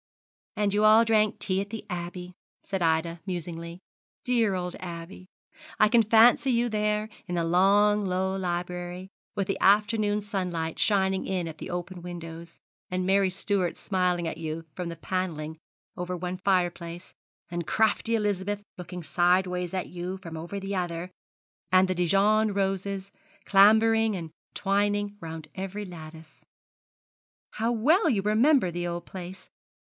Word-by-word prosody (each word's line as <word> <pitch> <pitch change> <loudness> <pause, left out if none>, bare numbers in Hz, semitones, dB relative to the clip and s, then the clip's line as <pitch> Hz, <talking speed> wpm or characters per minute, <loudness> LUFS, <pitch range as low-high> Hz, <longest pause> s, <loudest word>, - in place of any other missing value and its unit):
"' - - -80
'And 205 -1 +1
you 210 +1 +2
all 215 +2 +7
drank 215 -2 +2
tea 190 -1 0
at 200 - -6
the 220 -1 -6
Abbey,' 180 -1 -6 0.3
said 195 -2 -3
Ida, 165 +1 +1
musingly; 170 -1 -5 0.4
'dear 230 -6 +2
old 180 -1 -3
Abbey! 175 +1 -8 0.5
I 215 - +6
can 235 +1 +5
fancy 225 +4 +5
you 240 -1 +2
there, 210 0 0 0.2
in 180 - -3
the 170 - +1
long 200 +4 +4
low 190 +1 0
library, 180 0 -4 0.3
with 200 - 0
the 195 - -2
afternoon 210 +1 +3
sunlight 180 -6 -3
shining 190 -2 +2
in 180 -3 -1
at 160 -1 -8
the - - -7
open 175 +1 -5
windows, 170 -1 -8 0.3
and 185 0 -1
Mary 195 0 +3
Stuart 190 -1 -1
smiling 180 -3 0
at 160 - -5
you 160 0 -4
from 180 -2 -4
the 170 - -6
panelling 160 -3 -3 0.4
over 180 0 -4
one 180 +1 -4
fire 180 -2 +2
place, 170 +1 -10 0.4
and 175 -2 -3
crafty 220 +1 +2
Elizabeth 205 -1 -1 0.2
looking 180 0 -7
sideways 180 +1 +1
at 185 -1 -3
you 180 +2 -5
from 165 -4 -9
over 170 +5 -5
the 195 +1 -4
other, 175 0 -3 0.6
and 185 0 +5
the 185 - 0
Dijon 200 +4 +3
roses 195 0 -2 0.3
clambering 220 +2 +5
and 165 -3 -6 0.2
twining 205 +1 0
round 160 -1 -7
every 195 +2 -5
lattice.' 160 -3 -11 1.1
'How 225 +2 -1
well 295 - +3
you 205 -6 +1
remember 220 - +3
the 175 +1 -3
old 170 0 -4
place. 185 0 -9
185 Hz, 155 wpm, -27 LUFS, 175-205 Hz, 1.1 s, all